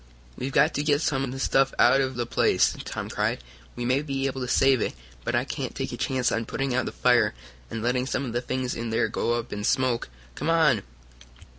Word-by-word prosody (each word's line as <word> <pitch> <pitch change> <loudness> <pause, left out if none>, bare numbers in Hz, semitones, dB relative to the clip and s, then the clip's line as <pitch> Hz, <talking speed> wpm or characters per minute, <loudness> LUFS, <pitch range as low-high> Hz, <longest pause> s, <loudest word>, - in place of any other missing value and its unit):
"We've 130 +2 -4
got 150 +3 +4
to - - 0
get 150 0 +2
some 135 -3 0
of 130 - -3
the 135 - -6
stuff 135 0 +2
out 135 - +5
of 130 -1 -2
the 120 0 -1
place!" - - +2
Tom - - -4
cried. - - -1 0.3
"We 120 - -4
may 130 +3 +2
be 135 -2 -2
able 135 -1 -2
to 125 - -3
save 135 -1 +4
it, - - -2 0.3
but - - -1
I - - +1
can't - - -4
take - - -3
a - - -4
chance 130 -2 0
on 115 0 -1
putting 135 -1 -2
out 130 - 0
the - - -3
fire 125 - +3 0.3
and 115 - -5
letting 125 +1 0
some 135 +1 -1
of 120 - -5
the 120 - 0
things 130 0 -2
in 115 0 -4
there 115 - +1
go 120 - 0
up 120 0 -3
in 105 0 -4
smoke. 125 - +1 0.2
Come 155 - -3
on!" 155 -10 +4
130 Hz, 240 wpm, -26 LUFS, 120-135 Hz, 0.3 s, out